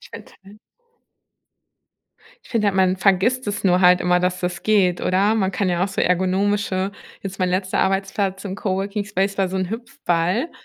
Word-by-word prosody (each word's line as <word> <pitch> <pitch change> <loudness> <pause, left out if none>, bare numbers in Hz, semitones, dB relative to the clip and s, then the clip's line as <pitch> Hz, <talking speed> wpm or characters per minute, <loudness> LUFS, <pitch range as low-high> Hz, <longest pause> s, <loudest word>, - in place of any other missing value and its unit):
Ich - - -16
finde - - -11
halt 200 +2 -15 1.9
Ich - - -18
finde 225 -3 +1
halt, 200 -2 +1
man 185 -1 +3
vergisst 200 +7 +2
das 205 0 -3
nur 180 -1 +3
halt 180 0 +5
immer, 180 0 +2
dass 180 0 0
das 180 0 -3
geht, 195 -5 +2
oder? 195 +4 +2
Man 190 -4 +1
kann 190 0 -1
ja 175 0 0
auch 195 - 0
so 195 - -2
ergonomische 190 +1 0 0.3
jetzt 195 -1 -6
mein 185 -1 +1
letzter 185 +1 -1
Arbeitsplatz 195 0 -1
im 190 -2 -4
Coworking 200 +1 -3
Space 195 0 -1
war 190 -1 +2
so 190 - -4
'n 185 -1 -2
Hüpfball 220 - -1
190 Hz, 185 wpm, -21 LUFS, 185-205 Hz, 1.9 s, halt